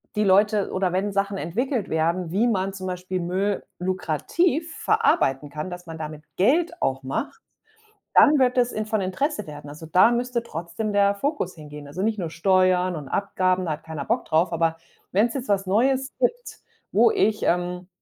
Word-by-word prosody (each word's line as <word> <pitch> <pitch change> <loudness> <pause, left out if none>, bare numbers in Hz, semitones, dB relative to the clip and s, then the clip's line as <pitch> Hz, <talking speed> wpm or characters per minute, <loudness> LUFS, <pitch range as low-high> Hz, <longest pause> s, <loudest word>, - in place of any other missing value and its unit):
die 210 - +2
Leute 205 +1 +3
oder 185 -1 0
wenn 195 +3 0
Sachen 200 0 0
entwickelt 220 - -2
werden, 165 +2 0
wie 210 +7 +2
man 195 -4 0
zum 190 -1 -6
Beispiel 185 0 -3
Müll 190 +3 -1 0.2
lukrativ 225 - -1
verarbeiten 310 - +2
kann, 150 +5 -5
dass 180 0 -8
man 165 0 -7
damit 155 -1 -7
Geld 325 - +2
auch 135 0 0
macht, 275 - -4 0.7
dann 295 0 +7
wird 250 -1 +3
das 245 -1 +2
in 215 - -2
von 215 -1 0
Interesse 210 +5 -2
werden. 150 -1 -9
Also 155 +2 -10
da 185 +8 +5
müsste 240 0 -1
trotzdem 175 +1 -4
der 200 0 +3
Fokus 280 - -2
hingehen. 150 -2 -10
Also 155 +7 -5
nicht 220 0 0
nur 170 -4 -3
Steuern 185 +1 +2
und 145 -3 -7
Abgaben, 185 -2 0
da 165 - -1
hat 150 - -7
keiner 160 -3 -5
Bock - - 0
drauf, 165 +2 +2
aber 165 0 +1 0.4
wenn's 220 +5 +2
jetzt 265 -2 -4
was 195 -2 +1
Neues 260 +7 +2
gibt, - - -1 0.3
wo - - +5
ich, 300 - +1
ähm, 180 +1 -1
190 Hz, 185 wpm, -24 LUFS, 170-230 Hz, 0.7 s, dann